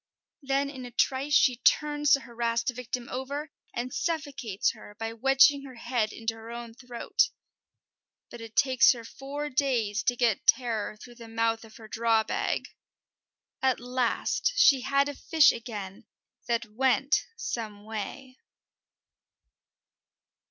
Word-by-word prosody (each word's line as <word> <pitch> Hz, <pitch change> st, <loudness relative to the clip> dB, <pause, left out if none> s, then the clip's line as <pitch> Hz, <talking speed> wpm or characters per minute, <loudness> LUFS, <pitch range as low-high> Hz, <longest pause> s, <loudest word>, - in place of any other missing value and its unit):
Then 275 Hz, 0 st, 0 dB
in 260 Hz, -3 st, -8 dB
a 245 Hz, -, -7 dB
trice 265 Hz, +4 st, +1 dB
she 255 Hz, -5 st, +5 dB
turns 295 Hz, +2 st, +3 dB
the 275 Hz, -, +4 dB
harassed 235 Hz, -1 st, -1 dB
victim 245 Hz, 0 st, -5 dB
over, 280 Hz, +4 st, -4 dB, 0.2 s
and 245 Hz, +2 st, -4 dB
suffocates 280 Hz, -, -1 dB
her 205 Hz, -, -14 dB
by 225 Hz, +1 st, -4 dB
wedging 270 Hz, +4 st, +4 dB
her 260 Hz, -2 st, -10 dB
head 235 Hz, -2 st, -1 dB
into 225 Hz, 0 st, -3 dB
her 225 Hz, 0 st, -11 dB
own 235 Hz, -1 st, -7 dB
throat. 245 Hz, 0 st, 0 dB, 1.0 s
But 240 Hz, -, -9 dB
it 225 Hz, -1 st, -10 dB
takes 260 Hz, -3 st, +5 dB
her 235 Hz, -2 st, -9 dB
four 285 Hz, +5 st, -6 dB
days 235 Hz, -6 st, +1 dB
to 245 Hz, -, +2 dB
get 235 Hz, -4 st, +1 dB
Terror 225 Hz, -4 st, +2 dB
through 240 Hz, +2 st, -13 dB
the 230 Hz, -, -9 dB
mouth 225 Hz, 0 st, 0 dB
of 220 Hz, -1 st, -14 dB
her 220 Hz, -, -12 dB
draw 225 Hz, 0 st, +2 dB
bag. -, -, -1 dB, 1.0 s
At 260 Hz, -2 st, +2 dB
last 250 Hz, -, 0 dB
she 275 Hz, -, +6 dB
had 275 Hz, +2 st, +2 dB
a 290 Hz, -, -4 dB
fish 315 Hz, +1 st, +4 dB
again 210 Hz, -5 st, -7 dB, 0.4 s
that 235 Hz, -1 st, 0 dB
went 265 Hz, +6 st, +2 dB
some 215 Hz, -, -5 dB
way! 255 Hz, +5 st, -7 dB
245 Hz, 140 wpm, -28 LUFS, 225-275 Hz, 1.0 s, she